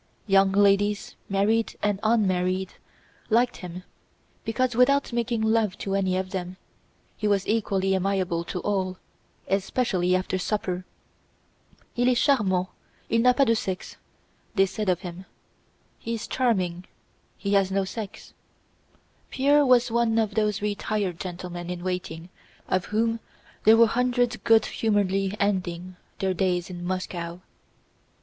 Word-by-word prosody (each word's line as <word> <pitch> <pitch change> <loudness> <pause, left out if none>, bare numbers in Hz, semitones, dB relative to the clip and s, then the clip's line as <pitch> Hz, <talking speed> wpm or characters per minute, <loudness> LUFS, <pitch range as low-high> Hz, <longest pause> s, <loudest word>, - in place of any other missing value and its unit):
Young 195 -1 +4
ladies, 205 +1 +2 0.2
married 210 +3 +1
and 205 -2 +1
unmarried, 190 -4 +1 0.6
liked 240 +2 +2
him 180 0 -8 0.6
because 245 +2 0
without 275 +2 +3
making 235 -1 0
love 220 -3 +1
to 195 - -4
any 190 -2 +1
of 185 0 -3
them, 185 -1 -4 0.6
he 210 - -2
was 200 -2 +1
equally 195 -3 +1
amiable 190 -3 0
to 180 - -4
all, 190 -3 -1 0.5
especially 190 -2 +1
after 185 0 -1
supper. 185 -2 -2 1.1
"Il 245 +1 +2
est 250 - +2
charmant; 190 -10 +2 0.4
il 230 - +3
n'a 250 +1 +6
pas 275 - +4
de 230 - +3
sexe," 190 -4 -4 0.3
* - - -38
they 195 -1 +5
said 210 +1 -3
of 180 -1 +1
him. 180 0 -8 0.4
* - - -39 0.3
"He 230 - -3
is 230 +1 -5
charming; 185 -10 0 0.5
he 200 0 -2
has 195 -1 +3
no 195 0 0
sex." 210 +1 -7 1.0
Pierre 285 +2 +3
was 250 -2 +4
one 230 -1 +2
of 220 -2 +1
those 210 -1 0
retired 205 -3 -2
gentlemen 175 -1 -6
in 180 -1 -5
waiting 180 -2 -4 0.4
of 185 -1 0
whom 225 +2 0 0.5
there 220 +1 +8
were 230 - +8
hundreds 245 +1 +1
good 225 -1 +4
humoredly 195 -2 0
ending 185 -3 -1 0.2
their 190 -1 0
days 180 0 0
in 175 -1 -7
Moscow. 175 -1 -4
195 Hz, 140 wpm, -25 LUFS, 185-225 Hz, 1.1 s, there